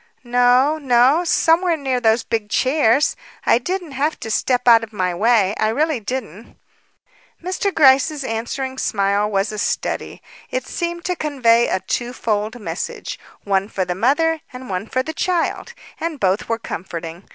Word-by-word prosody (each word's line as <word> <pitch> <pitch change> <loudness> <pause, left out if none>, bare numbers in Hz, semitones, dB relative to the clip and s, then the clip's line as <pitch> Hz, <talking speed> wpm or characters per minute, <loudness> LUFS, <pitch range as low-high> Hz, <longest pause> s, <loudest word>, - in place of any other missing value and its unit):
"No, 245 +5 +3
no. 265 +4 +4
Somewhere 335 0 +2
near 265 -4 -1
those 225 0 +2
big 220 -3 -3
chairs; 270 +2 +2 0.3
I 230 - +4
didn't 355 +3 -4
have 285 +4 -1
to 225 - -5
step 250 +3 0
out 230 -1 +7
of 225 - -8
my 185 -4 -1
way; 210 0 +3
I 215 - +2
really 300 +4 0
didn't." 225 -2 -6 0.8
Mr. 375 +3 -2
Gryce's 280 -1 +4
answering 260 +3 -4
smile 200 0 +1
was 200 0 0
a 215 - -5
study. - - -3 0.3
It 255 0 -3
seemed 345 0 -4
to 360 - -1
convey 245 -7 +2
a 190 - -1
two 245 -1 -3
fold 215 -1 -2
message, 210 - -5 0.2
one 195 -1 0
for 190 -4 -2
the 180 - -2
mother 295 - +1
and 250 -4 -9
one 185 +3 -3
for 255 +2 -1
the 315 - -5
child, 360 +8 -1 0.2
and 325 -3 -3
both 195 +3 0
were 230 - +1
comforting. 170 -4 -7
245 Hz, 165 wpm, -20 LUFS, 215-300 Hz, 0.8 s, out